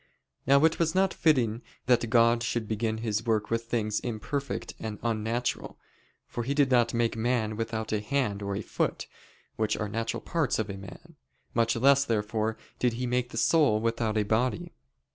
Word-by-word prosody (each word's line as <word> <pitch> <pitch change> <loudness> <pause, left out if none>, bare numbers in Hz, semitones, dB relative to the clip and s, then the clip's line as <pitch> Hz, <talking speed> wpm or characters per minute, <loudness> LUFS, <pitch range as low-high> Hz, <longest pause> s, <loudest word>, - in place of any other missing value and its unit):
Now 140 +3 +6
it 160 - +2
was 165 0 +1
not 190 0 +3
fitting 125 -8 +2 0.2
that 120 -2 +2
God 115 0 +4
should 115 -2 -2
begin 110 +1 -1
His 110 0 0
work 110 -2 0
with 115 0 0
things 110 -3 -1
imperfect 135 +5 -4
and 110 -2 -5
unnatural, 115 +1 -2 0.5
for 120 - -5
He 135 +4 -2
did 140 -2 +3
not 120 -2 +3
make 115 -1 +1
man 110 -1 0
without 110 0 -3
a 105 -1 0
hand 105 -4 -1
or 100 0 -3
a 105 - -3
foot, - - -2 0.5
which 110 -1 0
are 105 - -2
natural 115 +2 -3
parts 160 -6 0
of 110 -2 -2
a - - -6
man. 95 -1 -12 0.4
Much 115 -1 +2
less, 140 +3 +5
therefore, 110 -1 -1 0.2
did 125 -2 +2
He 125 +2 -3
make 125 0 0
the 115 - -8
soul 140 -5 +4
without 115 -1 0
a 105 - +3
body. 125 +11 -1
115 Hz, 180 wpm, -28 LUFS, 110-125 Hz, 0.5 s, Now